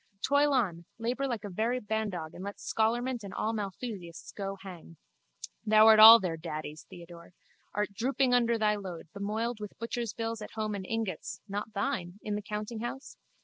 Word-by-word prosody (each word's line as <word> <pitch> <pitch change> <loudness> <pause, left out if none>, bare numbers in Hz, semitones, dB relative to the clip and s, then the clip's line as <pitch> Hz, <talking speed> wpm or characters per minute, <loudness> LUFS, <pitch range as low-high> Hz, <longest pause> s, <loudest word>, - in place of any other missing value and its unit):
Toil 285 +1 +3
on, 185 -11 0
labour 245 +4 -1
like 235 -5 -3
a 205 - -5
very 230 +7 0
bandog 205 -7 -3
and 180 - -8
let 200 0 -6
scholarment 240 +2 0
and 195 -1 -8
all 220 - -1
Malthusiasts 200 -4 -6
go 195 -1 -4
hang. 175 -4 -11 0.7
Thou 215 0 +6
art 220 -1 +8
all 225 +2 +12
their 175 -5 -2
daddies, 155 -1 -6
Theodore. 170 0 -12 0.4
Art 210 0 -1
drooping 255 +3 +1
under 235 -1 +3
thy 210 -1 +2
load, 180 -5 -8
bemoiled 215 +3 -2
with 210 -1 -8
butcher's 230 -1 -3
bills 225 -1 -3
at 210 - -8
home 215 -1 -2
and 190 -2 -5
ingots 225 -7 -3
(not 205 +2 -4
thine!) 180 -2 -2
in 210 - -3
the 210 - -2
countinghouse? 220 +5 -5
210 Hz, 175 wpm, -30 LUFS, 190-230 Hz, 0.7 s, all